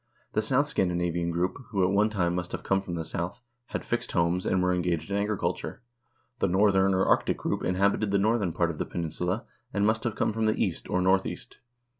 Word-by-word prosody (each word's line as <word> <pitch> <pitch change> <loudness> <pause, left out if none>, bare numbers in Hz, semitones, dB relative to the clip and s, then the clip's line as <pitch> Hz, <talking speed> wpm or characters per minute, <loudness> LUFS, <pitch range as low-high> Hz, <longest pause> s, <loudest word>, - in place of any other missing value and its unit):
The 110 - +2
south 130 +6 +2
Scandinavian 85 - 0
group, 85 +2 -1
who 100 -3 +1
at 90 - +3
one 105 +2 +3
time 90 -5 0
must 90 0 -3
have - - -4
come 95 0 +1
from 90 -3 -5
the 80 -1 -3
south, 90 +9 -4 0.2
had - - -4
fixed 120 - -2
homes, 85 +1 +1
and 95 -1 +2
were 90 0 +2
engaged 90 -1 -1
in 100 - +1
agriculture. 105 +2 -2 0.6
The - - +2
northern 95 0 +3
or 95 - +2
arctic - - +2
group - - -2
inhabited 100 +3 +1
the 100 - +2
northern 105 -2 +2
part 85 0 +1
of 80 - -9
the - - -1
peninsula, 90 +5 -2 0.3
and 100 0 +1
must 110 +1 +2
have 115 -3 -1
come - - 0
from 110 0 0
the 110 - +2
east, - - -1
or 90 0 +1
north 95 +1 +3
east. - - -8
95 Hz, 220 wpm, -28 LUFS, 90-105 Hz, 0.6 s, at